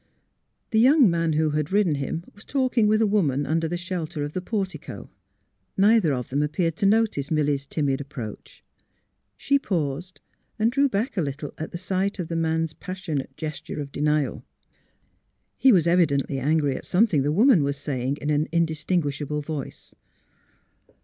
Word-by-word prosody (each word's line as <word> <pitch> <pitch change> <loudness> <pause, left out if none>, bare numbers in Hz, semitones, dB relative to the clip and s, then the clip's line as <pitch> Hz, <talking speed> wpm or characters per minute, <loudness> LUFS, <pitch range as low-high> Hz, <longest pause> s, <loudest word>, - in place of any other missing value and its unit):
The 220 - +3
young 260 - +6
man 165 -1 0
who 155 0 +1
had 150 +2 -1
ridden 200 -5 +3
him 145 +4 -3
was 205 - -14
talking 255 -5 +1
with 215 +1 +3
a - - +4
woman 155 -10 +1
under 160 +3 0
the 175 +2 -3
shelter 175 -4 -4
of 145 +1 -5
the 185 - -2
portico. 195 -1 -5 0.7
Neither 205 -4 +4
of 125 -3 -3
them 140 +3 0
ap 150 0 -1
peared 165 -4 0
to 200 - +2
notice 205 -10 +2
Milly 150 -2 +2
's 135 0 -7
timid 140 -3 -1
approach. 130 -6 -9 0.7
She 280 0 +2
paused 175 - -3 0.4
and 225 +1 +2
drew 280 +2 +3
back 220 +2 -2
a - - +2
little 145 0 -4
at 160 +2 -5
sight 190 +3 -1
of 175 -4 -4
the 165 - -3
man's 160 -1 0
passionate 160 -9 -5
gesture 155 -1 -5
of 140 -1 -5
denial. 150 0 0 1.1
He 265 - +5
was 180 -7 +4
evidently 145 -6 +2
angry 145 0 +1
at - - -6
something 180 -6 +3
the 145 +2 0
woman 215 - +5
was 140 0 -1
saying 140 -1 -2
in 150 - 0
an 150 +1 +1
indistinguishable 150 -3 -1
voice. 145 -3 -7
160 Hz, 170 wpm, -24 LUFS, 145-195 Hz, 1.1 s, young